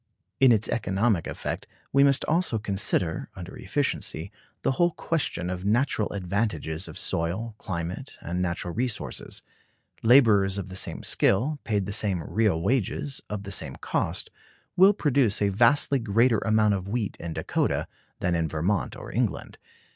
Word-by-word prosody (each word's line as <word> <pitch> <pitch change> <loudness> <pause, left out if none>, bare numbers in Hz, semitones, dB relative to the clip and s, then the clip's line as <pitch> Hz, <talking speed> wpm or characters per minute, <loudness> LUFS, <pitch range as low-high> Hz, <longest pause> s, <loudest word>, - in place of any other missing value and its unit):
In 135 -2 +7
its 110 -2 +3
economic 100 -4 0
effect - - -4 0.3
we 140 +1 +6
must 140 -1 +3
also 165 -7 +1
consider, 95 -5 -1
under 95 0 -8
efficiency, 100 - -2 0.3
the - - +2
whole 175 +6 +3
question 135 - -2
of 90 0 -5
natural 110 +1 +1
advantages 90 -4 -2
of - - -9
soil, 95 +8 -2
climate, 90 +8 -5
and 90 +2 -3
natural 85 -1 -2
resources. 120 +1 -4 0.6
Laborers 110 -6 +5
of 95 -1 -4
the 95 - -8
same - - -2
skill, 135 +10 +2
paid 105 -4 0
the 100 - -4
same 100 -5 0
real 105 -2 +1
wages, 130 +4 -1
of 105 -1 -4
the 100 - -7
same 80 -8 -3
cost, - - -2 0.4
will 190 +3 +7
produce 140 - +2
a 100 - +2
vastly 120 +7 +3
greater 115 +1 +3
amount 110 -1 +3
of 95 -1 -3
wheat 105 -1 -2
in 85 -1 -5
Dakota - - -1 0.3
than 90 - +1
in 85 -1 +1
Vermont 85 +7 -1
or - - -9
England. - - -2
105 Hz, 155 wpm, -26 LUFS, 90-120 Hz, 0.6 s, In